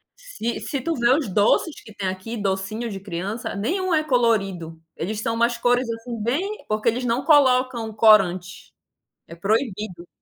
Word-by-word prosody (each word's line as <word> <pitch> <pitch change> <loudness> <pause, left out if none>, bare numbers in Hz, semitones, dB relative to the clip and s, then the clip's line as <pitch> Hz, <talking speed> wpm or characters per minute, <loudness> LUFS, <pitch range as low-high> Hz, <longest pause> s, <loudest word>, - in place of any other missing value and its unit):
Se - - -5
se 275 -3 -3
tu 330 -1 -1
ver 240 +2 +3
os 305 - -2
doces 210 - +2
que 215 - -13
tem 195 -2 -4
aqui, 190 +5 -5
docinho 200 +4 -2
de 195 -2 -6
criança, 200 +5 -5
nenhum 355 - -1
é 310 -1 +3
colorido. 195 - 0
Eles 210 +5 -4
são 230 0 -1
umas 235 +1 +1
cores 245 +1 +2
assim 230 0 -5
bem, 365 - -2
porque 215 +2 +1
eles 250 +2 -2
não 245 +3 0
colocam 255 -6 +3
corante. 190 -5 +3 0.5
É 170 - -10
proibido. 200 -3 -2
225 Hz, 165 wpm, -23 LUFS, 195-250 Hz, 0.5 s, ver